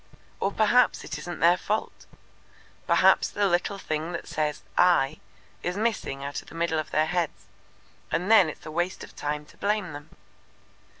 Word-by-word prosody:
Or 195 - 0
perhaps 230 +4 +3
it 150 0 -5
isn't 175 +3 -7
their 170 +2 +6
fault. 215 +3 -3 0.8
Perhaps - - +4
the 205 -1 +1
little 185 +2 0
thing 160 -2 -3
that 170 - -5
says 150 -1 -2
'I' 155 -5 +3 0.4
is 180 +2 -3
missing 210 -11 -1
out 140 +1 -4
of - - -22
the - - -12
middle 165 -1 0
of 155 - -4
their 155 - +2
heads, 170 -1 -2 0.7
and 180 +5 0
then 195 -7 +7
it's 155 - -10
a 155 - -6
waste 175 +3 -2
of - - -12
time 150 0 -3
to - - -20
blame 205 -5 -1
them. 145 +1 -9
170 Hz, 175 wpm, -26 LUFS, 155-195 Hz, 0.8 s, then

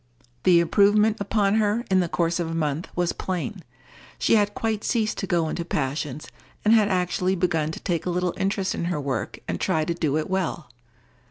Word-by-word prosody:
The 175 -2 +6
improvement 210 +5 +4
upon 200 0 +1
her, 220 +3 +1
in 190 - +5
the 175 -2 0
course 170 +1 0
of 170 -2 -2
a 165 - -3
month, 155 0 -1
was 175 -1 0
plain. 185 +2 -4 0.6
She - - +2
had 205 -2 +3
quite 220 -2 -1
ceased 220 -3 0
to 195 - -3
go 170 -2 +1
into 170 - -3
passions, 145 -2 -3 0.4
and 215 - +6
had 215 -3 +5
actually 185 0 0
begun 165 -4 0
to - - -7
take 175 -2 -2
a - - +1
little 180 0 0
interest 195 0 -1
in - - -3
her 175 -3 -1
work 135 -7 -3
and - - -3
try 155 -1 +1
to 170 - -1
do 155 -3 0
it 155 - -2
well. 175 -8 -2
180 Hz, 200 wpm, -24 LUFS, 165-200 Hz, 0.6 s, The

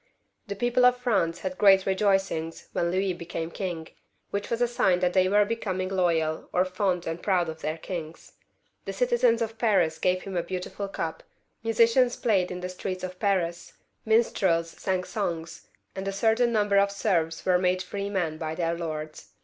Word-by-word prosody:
The 200 - -4
people 240 +4 +1
of 250 0 +6
France 195 -9 0
had 185 -1 -4
great 195 -2 +6
rejoicings 195 -4 0
when 170 - 0
Louis 185 +1 0
became 170 -1 -5
king, 175 -5 -4 0.4
which 200 0 -3
was 235 - -1
a 245 - +3
sign 190 -6 +2
that 180 -1 +2
they 185 -1 +3
were 205 +1 +4
becoming 190 -4 -2
loyal, 165 -4 0
or 180 - +2
fond 185 -1 -1
and 165 +1 -4
proud 180 -4 +1
of 160 0 -8
their 155 +1 -2
kings. 165 -1 -7 0.5
The 195 - -4
citizens 240 +1 +2
of 225 0 -6
Paris 200 -8 +2
gave 185 0 +1
him 195 -1 -6
a 175 - +1
beautiful 185 +3 -5
cup, 165 -4 -4 0.4
musicians 230 +2 +3
played 195 -7 +1
in 180 0 -6
the 180 - -4
streets 185 0 -5
of 180 0 -6
Paris, 175 -4 -1 0.3
minstrels 190 -7 +2
sang 185 0 -2
songs, 170 -6 -4 0.3
and 190 0 -4
a - - 0
certain 225 +4 +2
number 205 -3 +3
of 200 0 +3
serfs 170 -6 -1
were 180 -1 +4
made 185 0 +1
free 200 +2 -4
men 170 -6 -2
by 160 -1 -3
their 170 -1 0
lords. 155 -2 -6
185 Hz, 180 wpm, -27 LUFS, 170-205 Hz, 0.5 s, of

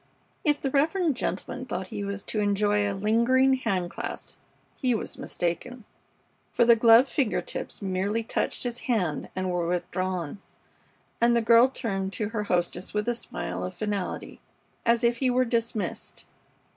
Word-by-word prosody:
If 295 -3 +2
the 270 - -2
reverend 315 +2 +2
gentleman 255 +1 -4
thought 185 -4 -4
he 205 - -4
was 200 0 -4
to 215 - -2
enjoy 205 0 +2
a - - -2
lingering 235 +6 +3
hand 190 -9 -1
clasp - - -6 0.5
he 250 -3 +2
was - - -5
mistaken, 180 +8 -3 0.7
for 235 - +3
the 235 0 +7
gloved 230 +3 +7
finger 260 -5 0
tips - - -5
merely 195 +4 -1
touched - - -1
his 245 0 -2
hand 185 -10 0
and 185 0 -1
were 175 -1 -1
withdrawn, 180 0 -2 0.8
and 235 0 +5
the 235 - +3
girl 235 +3 +6
turned 195 -6 -3
to 210 +2 -2
her 215 -2 -3
hostess 180 +1 -1
with 210 +2 0
a 240 - +2
smile 90 - -4
of 90 - -5
finality 205 -3 -3 0.5
as 235 +1 +3
if 235 0 +3
he 260 +1 +1
were 255 +1 +3
dismissed. 230 -5 -2
215 Hz, 160 wpm, -27 LUFS, 190-240 Hz, 0.8 s, the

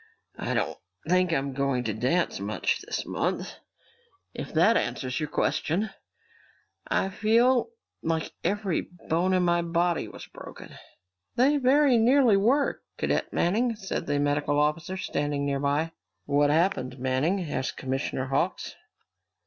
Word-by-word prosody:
"I - - -2
don't - - -1 0.3
think 180 0 +3
I'm 140 -3 -1
going 135 -2 0
to 110 -3 -2
dance 130 - 0
much 105 +2 -1
this - - -4
month, - - -2 0.8
if - - -6
that - - +4
answers 125 -2 -1
your 155 - -3
question. 170 +7 0 1.0
I 190 - +1
feel 235 - +3 0.3
like 160 -1 -1
every 200 -3 0
bone 175 +1 -2
in 180 - +2
my 175 0 +2
body 170 0 0
was - - -10
broken!" - - -11 0.6
"They 275 +4 +4
very 270 -1 +4
nearly 245 -1 +5
were, 250 +9 +2 0.2
Cadet - - -1
Manning," 230 +7 +1
said 190 -4 -4
the 145 -1 +1
medical 145 0 +1
officer, 155 +5 0
standing 145 -5 -2
near 140 -1 0
by. 145 +3 0 0.3
"What 145 0 +3
happened, 150 -6 +1
Manning?" 130 +9 0
asked 130 -5 -3
Commissioner 130 0 -2
Hawks. 135 +1 -1
165 Hz, 135 wpm, -27 LUFS, 140-200 Hz, 1.0 s, nearly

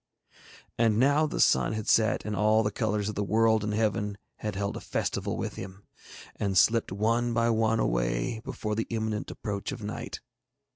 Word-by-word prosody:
And 115 -2 +3
now 145 +5 +4
the - - -4
sun 65 +9 +3
had 110 -1 -4
set, 110 -1 +3
and 105 0 -2
all 110 +2 +3
the 105 - 0
colours 105 -3 -1
of 105 - -2
the 105 - -2
world 110 +1 +3
and 105 - -1
heaven 105 -1 0 0.2
had 105 -2 -4
held 100 0 -2
a - - -4
festival - - -2
with - - -4
him, 95 +1 -8 0.5
and 100 -2 -1
slipped 115 +4 +4
one 115 +4 +1
by 115 0 +3
one 110 0 +2
away - - 0
before 115 -5 -4
the 115 +1 -2
imminent 110 -2 -2
approach 100 +4 -4
of 125 -5 -7
night. 105 - -5
110 Hz, 185 wpm, -28 LUFS, 100-115 Hz, 0.5 s, now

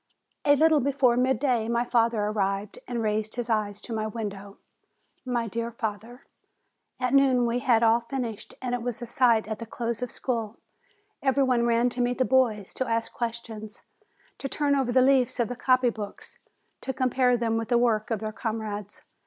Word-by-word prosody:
A 285 0 +6
little 315 +1 +4
before 265 -2 +2
midday, 255 -2 +1
my 235 +1 0
father 230 -2 +2
arrived 200 -1 -2
and 240 -2 -2
raised 215 0 0
his 240 -1 -3
eyes 205 -2 0
to 235 - -7
my 215 -1 -1
window; 205 -2 -6 0.7
my 240 -2 -1
dear 230 +2 -3
father! 230 +2 -6 0.7
At 255 0 0
noon 265 -3 +4
we 235 +1 0
had 235 -2 +3
all 230 +1 +5
finished. 235 -3 -5
And 250 -1 -2
it 245 - -1
was 240 0 -4
a - - -3
sight 235 -3 +2
at 220 -1 -4
the 230 - -7
close 235 0 -3
of 250 - -2
school! 230 -4 -3 0.6
Every 275 0 +2
one 245 -2 +2
ran 235 +1 +3
to 245 0 -3
meet 245 0 0
the 255 - +2
boys, 235 -7 +1
to 260 - -2
ask 230 0 -1
questions, 225 -3 -6 0.6
to 275 - -4
turn 290 +1 +1
over 265 -3 0
the 255 +1 +5
leaves 260 -2 +3
of 235 - +1
the 245 - -4
copy 255 0 +3
books 210 -3 -8 0.4
to 265 - -3
compare 255 -1 +2
them 230 -1 0
with 225 0 -3
the 240 - +4
work 230 -1 +1
of 220 -3 -2
their 215 -1 -3
comrades. 215 -3 -5
235 Hz, 190 wpm, -26 LUFS, 220-250 Hz, 0.7 s, A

